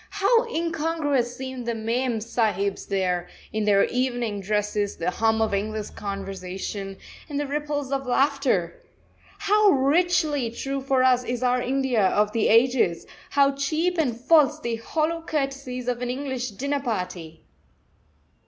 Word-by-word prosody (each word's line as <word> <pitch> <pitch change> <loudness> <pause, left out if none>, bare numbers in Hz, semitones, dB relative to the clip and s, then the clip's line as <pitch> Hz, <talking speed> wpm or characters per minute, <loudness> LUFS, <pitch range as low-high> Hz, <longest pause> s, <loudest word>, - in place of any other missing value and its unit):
How 455 +4 +3
incongruous 315 -6 -1
seemed 260 -2 -6
the 235 - 0
mem 230 +1 -1
sahibs 215 -3 -1
there, 180 -2 0 0.3
in 215 -1 0
their 200 -1 +5
evening 245 -5 -1
dresses, 210 0 -1
the 170 +2 -1
hum 225 +2 +2
of 220 - -1
English 215 +1 -2
conversation, 195 0 -5 0.3
and 290 -1 -2
the 290 - -1
ripples 290 -1 -3
of 270 -1 -2
laughter! 260 - +1 0.6
How 420 +1 +4
richly 295 -2 +2
true 270 +4 -4
for 265 -1 +2
us 250 -1 +4
is 245 0 -3
our 250 0 +2
India 260 -2 +1
of 210 +2 +2
the 225 0 +1
ages; 230 -7 +3 0.2
how 280 -1 +4
cheap 310 +6 -1
and 245 -7 0
false 300 +2 +4
the 235 -5 -2
hollow 320 +7 -1
courtesies 275 -5 -3
of 245 -1 -1
an 245 - -2
English 260 -1 -3
dinner 280 +7 -2
party! 180 - -5
250 Hz, 145 wpm, -25 LUFS, 215-280 Hz, 0.6 s, their